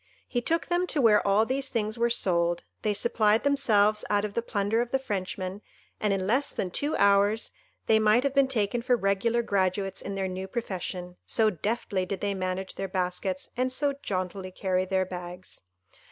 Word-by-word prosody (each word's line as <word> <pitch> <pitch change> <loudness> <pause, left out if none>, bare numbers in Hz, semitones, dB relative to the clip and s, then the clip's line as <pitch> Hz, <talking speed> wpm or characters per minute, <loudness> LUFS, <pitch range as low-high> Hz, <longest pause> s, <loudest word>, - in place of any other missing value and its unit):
He 245 - -1
took 330 +7 0
them 350 +1 0
to 310 - -1
where 220 -5 +5
all 205 +3 +4
these 270 +2 -2
things 215 -1 -1
were 235 0 +1
sold; 175 -6 +1 0.2
they 210 -1 0
supplied 215 0 +2
themselves 215 -7 +3
out 205 0 +2
of 205 - -5
the 235 - 0
plunder 215 0 0
of 240 - -3
the 270 - +2
Frenchman, 195 -5 -4 0.4
and 210 - +1
in 195 -1 0
less 250 +8 +1
than 180 - -3
two 290 - 0
hours 200 +2 +3 0.3
they 220 -1 +4
might 215 +3 +4
have 280 -1 0
been 275 -1 +4
taken 235 -2 0
for 250 +1 +2
regular 225 +3 +1
graduates 195 -2 0
in 200 - -5
their 195 -1 -1
new 185 +1 -5
profession, 185 -4 -5
so 220 -2 +3
deftly 195 0 -2
did 195 0 -3
they 205 -1 -1
manage 185 0 -3
their 195 - -4
baskets, 185 0 -2
and 255 +1 0
so 285 +2 0
jauntily 185 -7 -4
carry 185 0 -1
their 190 0 +1
bags. 180 0 -9
205 Hz, 190 wpm, -27 LUFS, 185-235 Hz, 0.4 s, where